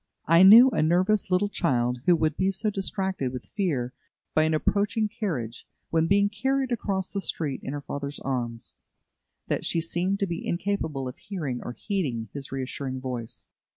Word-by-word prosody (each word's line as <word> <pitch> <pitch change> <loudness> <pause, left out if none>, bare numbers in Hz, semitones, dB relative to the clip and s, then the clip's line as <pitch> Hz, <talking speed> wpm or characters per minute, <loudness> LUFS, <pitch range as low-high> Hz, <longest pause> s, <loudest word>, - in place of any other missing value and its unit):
I 165 +2 +6
knew 225 +7 +10
a - - +1
nervous 185 +6 +2
little 185 +2 +2
child 125 -10 0
who 175 - +7
would 155 -2 0
be 190 +2 +1
so 200 +3 -1
distracted 190 -7 -2
with 125 -1 -7
fear 140 - -2 0.4
by 155 - +4
an 160 0 +1
approaching 210 +6 +1
carriage, 155 - -4 0.2
when 165 0 +2
being 200 +2 +4
carried 265 +5 -1
across 195 -5 -1
the 200 - -1
street 150 -7 -3
in 135 - -5
her 145 - -4
father's 140 0 -5
arms, 120 -3 -3 0.7
that - - -1
she 170 - +2
seemed 175 +4 -1
to - - +3
be 170 -2 -4
incapable 170 -7 -2
of 125 - -7
hearing 155 - -4
or 120 - -6
heeding 130 - -3
his 140 -1 -6
reassuring 130 0 -4
voice. 125 -3 -6
165 Hz, 175 wpm, -26 LUFS, 135-200 Hz, 0.7 s, knew